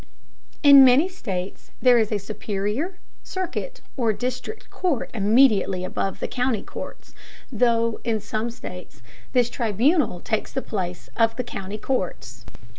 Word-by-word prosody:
In 280 -2 +10
many 260 +6 +6
states 195 - -6
there 250 -2 +5
is 220 -1 0
a 210 - +1
superior, 210 - -3 0.2
circuit, 375 +7 -5
or 230 -5 +1
district 255 - -5
court 340 -10 -1
immediately 210 -4 +3
above 195 +1 -3
the - - -1
county 250 -4 -1
courts, - - -9 0.4
though 230 -1 +2
in 225 -2 0
some 215 +2 -3
states 180 - -10 0.3
this 245 -2 +4
tribunal 240 - +1
takes 220 +4 -2
the 265 - -2
place 180 -4 -4
of 225 -1 +3
the 250 - -2
county 200 -3 -6
courts. 135 - -4
230 Hz, 135 wpm, -24 LUFS, 200-260 Hz, 0.4 s, In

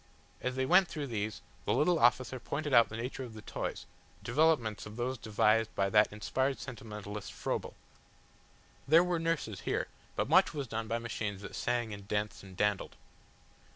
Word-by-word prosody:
As 125 0 -2
they 130 0 +1
went 180 +5 +6
through 150 -4 -4
these, 110 -4 -3 0.2
the - - +2
little 170 +2 +3
officer 125 +2 +3
pointed 145 +3 -3
out 115 -2 +7
the 110 - -6
nature 125 +3 -4
of 115 -3 -9
the 110 - -9
toys, - - -4 0.4
developments 120 -6 +2
of 105 - -10
those 125 +2 -1
devised 110 -1 +2
by 100 0 +1
that 105 -1 +5
inspired 130 +6 -1
sentimentalist 105 -5 -7
Froebel. - - -3 1.1
There 160 +4 +7
were 180 -1 0
nurses 160 - -1
here, - - -1 0.3
but - - 0
much - - +5
was 140 -2 -2
done 110 -1 -4
by 115 - 0
machines 110 -4 -4
that 100 - -8
sang 120 -3 -1
and 100 -1 -9
danced 105 0 -2
and 95 -2 -13
dandled. 105 0 0
115 Hz, 175 wpm, -32 LUFS, 105-135 Hz, 1.1 s, out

